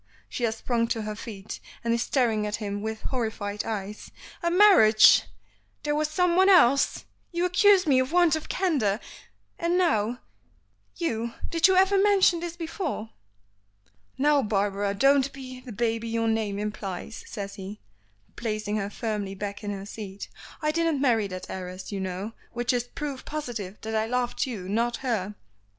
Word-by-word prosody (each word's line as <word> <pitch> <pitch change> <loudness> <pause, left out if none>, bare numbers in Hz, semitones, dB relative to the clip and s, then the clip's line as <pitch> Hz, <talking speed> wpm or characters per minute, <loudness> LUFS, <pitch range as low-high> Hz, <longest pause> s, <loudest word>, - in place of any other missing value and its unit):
she 240 - -2
has 220 -1 -1
sprung 230 0 0
to 225 -1 -2
her 210 0 -4
feet, 210 -2 -8 0.2
and 230 0 +1
is 235 - 0
staring 225 -5 +1
at 210 - -2
him 205 -1 -4
with 220 0 -5
horrified 220 -5 -3
eyes. 210 -2 -5 0.3
"A 340 - +1
marriage! 345 - +7 0.6
There 295 - 0
was 305 +1 +1
someone 360 +4 +3
else! 275 -8 +4 0.3
You 345 0 0
accuse 380 +1 +5
me 275 -4 +4
of 260 +2 0
want 345 -2 +4
of 315 - -6
candor, 270 - +1 0.6
and 340 +1 +1
now, 235 - +2 0.8
you 235 -8 -2 0.2
did 335 +1 +5
you 380 - +3
ever 385 +1 +4
mention 390 -4 +4
this 340 0 -5
before?" 325 - -4 1.1
"Now, 290 +1 +4
Barbara, 200 -2 0
don't 275 +4 +4
be 260 -2 -9
the 250 -1 -10
baby 230 +1 -1
your 225 0 0
name 220 -3 0
implies," 210 0 -5
says 200 -2 -6
he, 195 +2 -8 0.6
placing 215 -2 -2
her 200 -1 -2
firmly 205 -3 -3
back 200 +1 -5
in 205 - -3
her 195 -1 -5
seat. 205 -2 -8 0.3
"I 305 - +2
didn't 330 -2 +1
marry 230 -6 +2
that 185 -1 -7
heiress, 185 +1 -7
you 200 - -3
know, 190 +3 -4 0.2
which 240 +2 0
is 245 -1 0
proof 275 +1 -6
positive 235 -10 -5
that 220 0 -5
I 220 0 +1
loved 250 +2 -1
you, 205 -8 -5
not 230 +4 0
her." 210 -4 -1
230 Hz, 165 wpm, -26 LUFS, 210-295 Hz, 1.1 s, marriage